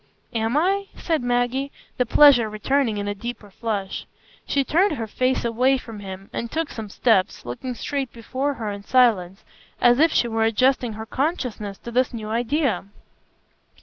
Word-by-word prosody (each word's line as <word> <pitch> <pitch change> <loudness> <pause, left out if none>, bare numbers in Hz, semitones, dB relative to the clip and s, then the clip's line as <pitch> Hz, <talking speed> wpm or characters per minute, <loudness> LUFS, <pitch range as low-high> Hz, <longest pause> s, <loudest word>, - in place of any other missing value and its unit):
"Am 225 +3 0
I?" 390 +5 +1
said 320 -4 -1
Maggie, 245 +3 0 0.3
the 250 - +1
pleasure 250 -5 +6
returning 225 +2 0
in 205 0 -3
a 205 - -1
deeper 220 -1 -7
flush. 200 -3 -4 0.4
She 280 - +2
turned 360 +7 +2
her 230 -6 -3
face 255 +4 0
away 250 +4 +3
from 225 -4 -9
him 195 -1 -8
and 235 - -3
took 325 -1 -2
some 220 -2 -6
steps, 200 -3 +1
looking 240 - -5
straight 275 +1 -3
before 260 +5 -3
her 220 -4 -4
in 200 0 -6
silence, 205 -7 +2 0.4
as 245 +1 +5
if 320 +1 +5
she 240 - +2
were 225 -1 0
adjusting 245 +1 +2
her 220 +1 -7
consciousness 245 - -2
to 235 - -9
this 250 0 +1
new 215 -2 -6
idea. 240 - 0
240 Hz, 170 wpm, -23 LUFS, 215-270 Hz, 0.4 s, pleasure